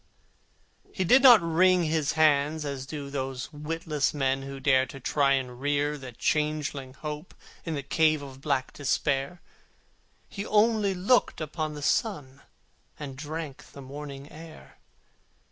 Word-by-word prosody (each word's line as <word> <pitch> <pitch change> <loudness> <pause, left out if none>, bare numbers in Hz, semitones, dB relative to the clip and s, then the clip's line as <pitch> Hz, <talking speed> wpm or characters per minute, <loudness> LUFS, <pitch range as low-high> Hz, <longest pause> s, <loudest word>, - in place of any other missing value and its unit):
He 190 - -2
did 250 +9 +6
not 245 -8 +8
wring 180 +2 +4
his 155 -2 0
hands, 155 0 +2
as 135 -2 -5
do 140 -2 -6
Those 135 0 -4
witless 150 0 -2
men 135 -1 0
who 135 0 -7
dare 130 -1 +3
To 135 - -10
try 140 +1 +2
to 125 -1 -7
rear 145 +3 0
the 130 -3 -9
changeling 145 -1 -2
Hope 150 +3 -7 0.3
In 165 -2 -2
the 140 - -4
cave 155 +1 +2
of 135 -1 -11
black 140 -3 -1
Despair: 140 +3 -1 0.9
He 200 - -6
only 210 -2 +2
looked 205 +8 +2
upon 155 0 -4
the 145 - -7
sun, 145 - -1 0.6
And 140 -3 -7
drank 150 0 -7
the 140 - -10
morning 140 +1 -9
air. 160 0 -13
150 Hz, 145 wpm, -27 LUFS, 135-160 Hz, 0.9 s, not